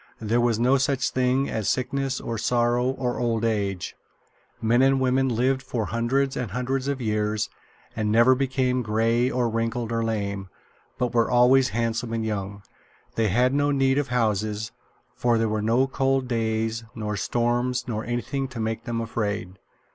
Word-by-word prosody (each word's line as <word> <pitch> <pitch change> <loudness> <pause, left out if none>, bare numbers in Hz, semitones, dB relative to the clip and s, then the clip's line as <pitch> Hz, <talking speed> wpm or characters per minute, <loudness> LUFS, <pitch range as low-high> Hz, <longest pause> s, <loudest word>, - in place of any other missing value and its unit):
There 115 +2 +1
was 120 -2 +2
no 125 +3 +4
such 130 -2 0
thing 130 +1 +1
as 110 -3 -2
sickness 135 +1 -1
or 115 -2 -4
sorrow 120 +2 +1
or 130 -2 -2
old 115 -2 0
age. 100 -4 -2 0.6
Men 115 +3 +3
and 135 0 +4
women 130 +1 +2
lived 130 +3 +1
for 120 -4 -3
hundreds 130 +5 0
and 125 -4 -3
hundreds 130 +5 -2
of 140 -1 -1
years 105 -2 -1 0.4
and 110 -1 -1
never 115 +4 +6
became 130 -1 0
gray 115 +2 +1
or 125 -2 0
wrinkled 115 +1 -2
or 115 0 0
lame, 100 -3 -3 0.5
but 125 -1 -1
were 115 -1 +2
always 125 +2 +5
handsome 115 +1 -2
and 115 -1 -1
young. 100 -2 -4 0.5
They 115 -1 +1
had 125 +6 +2
no 145 +1 +2
need 135 -1 +2
of 145 - -1
houses, 110 -3 -1 0.4
for 120 -1 +1
there 115 0 +1
were 110 0 -1
no 115 +5 +3
cold 135 -1 0
days 115 -1 -1
nor 105 -2 -3
storms 120 +4 0
nor 110 -2 -3
anything 120 +3 -2
to 130 -3 -8
make 110 0 -3
them 115 -1 -2
afraid. 105 -4 -3
120 Hz, 170 wpm, -25 LUFS, 110-130 Hz, 0.6 s, never